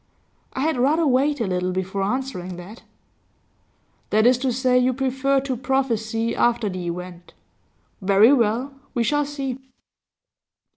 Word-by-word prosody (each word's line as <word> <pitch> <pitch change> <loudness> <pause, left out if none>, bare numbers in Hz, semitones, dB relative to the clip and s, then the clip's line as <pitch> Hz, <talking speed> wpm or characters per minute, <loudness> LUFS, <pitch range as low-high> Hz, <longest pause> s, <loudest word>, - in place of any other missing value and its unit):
'I 260 - -3
had 315 -1 0
rather 300 +6 +2
wait 280 +2 +2
a 230 - 0
little 180 -1 -1
before 190 +1 -3
answering 195 -5 -3
that.' 185 +6 -11 1.3
'That 215 +1 +3
is 250 0 +5
to 260 0 0
say, 250 0 +2
you 255 +1 +2
prefer 270 +1 +1
to 265 -1 -3
prophesy 230 -3 -1
after 235 -3 +1
the 180 -2 -5
event. 175 0 -7 0.7
Very 200 +6 +5
well, 245 +2 +1 0.2
we 240 - +2
shall 295 +4 +1
see. 275 -3 -4
245 Hz, 140 wpm, -22 LUFS, 200-270 Hz, 1.3 s, is